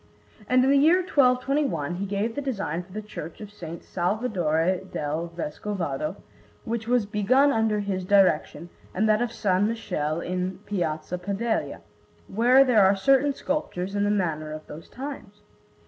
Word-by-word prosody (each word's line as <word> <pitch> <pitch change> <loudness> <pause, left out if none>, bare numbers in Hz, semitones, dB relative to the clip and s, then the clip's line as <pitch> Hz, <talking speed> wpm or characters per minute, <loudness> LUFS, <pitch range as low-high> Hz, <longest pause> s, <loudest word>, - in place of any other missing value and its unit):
And 255 0 +4
in 265 - +3
the 280 - +5
year 325 +6 +5
1221 255 - +1
he 200 +2 -3
gave 205 +3 -1
the 285 - -3
design 200 - -3
for 180 - -17
the 215 +3 -6
Church 170 -6 -8
of 210 -2 -8
S. 170 -5 -9
Salvadore 180 -3 0
del 155 +3 -2
Vescovado, 165 -2 -3 0.5
which 230 -1 -3
was 245 -3 +2
begun 240 +8 +3
under 220 -3 +1
his 195 -2 -2
direction, 185 -3 +2 0.3
and 215 +4 +2
that 215 +1 +3
of 240 - 0
S. 230 - -13 0.2
Michele 185 -8 -1
in 180 +1 -3
Piazza 175 -3 -2
Padella, 200 -4 -2 0.5
where 245 +6 +5
there 240 -6 +4
are 190 +1 +5
certain 275 +7 +3
sculptures 195 -12 -3
in 205 0 0
the 205 - +1
manner 160 -7 -1
of 155 0 -7
those 155 +2 -11
times. 255 -7 -8
205 Hz, 160 wpm, -25 LUFS, 175-240 Hz, 0.5 s, the